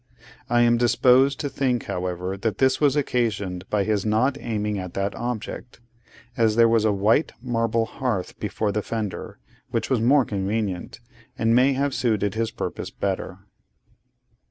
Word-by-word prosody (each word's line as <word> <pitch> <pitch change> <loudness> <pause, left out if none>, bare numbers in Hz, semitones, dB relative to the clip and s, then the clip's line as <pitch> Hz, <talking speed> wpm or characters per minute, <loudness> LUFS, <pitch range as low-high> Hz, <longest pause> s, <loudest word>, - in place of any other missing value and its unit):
I 120 0 +3
am 120 0 +4
disposed 125 +3 +4
to 145 - -1
think, 130 -4 -1
however, 90 +1 -3
that 105 0 -2
this 130 +1 +2
was 145 -2 +4
occasioned 105 -9 -1
by 105 -2 +1
his 105 -1 0
not 110 +6 +2
aiming 105 -4 -2
at 90 -2 -7
that 100 +1 -1
object; 120 +1 -5 0.6
as 110 -2 +2
there 115 0 +6
was 115 -1 +3
a 110 - +4
white 105 +9 +2
marble 115 -2 0
hearth 115 -5 -3
before 105 -2 -2
the 105 +1 -1
fender, 105 -3 -5 0.3
which - - -2
was 125 -4 +2
more 135 +3 +4
convenient, 100 -2 -3 0.4
and 115 0 +2
may 130 +3 +4
have 140 +1 0
suited 105 -6 0
his 115 0 -1
purpose - - -5
better. 95 -1 -4
115 Hz, 155 wpm, -24 LUFS, 100-125 Hz, 0.6 s, there